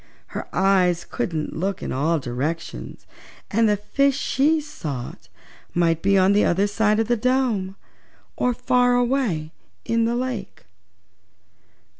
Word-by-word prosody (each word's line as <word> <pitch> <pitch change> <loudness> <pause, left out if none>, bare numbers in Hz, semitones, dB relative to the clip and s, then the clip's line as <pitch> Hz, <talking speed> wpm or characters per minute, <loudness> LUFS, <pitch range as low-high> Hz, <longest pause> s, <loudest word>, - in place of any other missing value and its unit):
Her - - -6
eyes 185 -3 +2
couldn't 160 -3 -3
look 195 +4 -2
in - - -4
all 155 +6 +1
directions 135 - -5 0.5
and 225 +1 +3
the 210 - +2
fishes 275 +6 +1
she 300 +5 +2
sought 150 - -7 0.5
might 165 -2 +2
be 195 0 +3
on 190 +1 +4
the 205 - +4
other 190 +4 +2
side 210 +1 +1
of 225 - +1
the 240 - +2
dome, 235 -5 0 0.6
or 250 - +1
far 245 0 +2
away 240 - 0 0.3
in 230 0 +1
the 235 +1 0
lake. 245 -6 -4
200 Hz, 135 wpm, -23 LUFS, 170-245 Hz, 0.6 s, on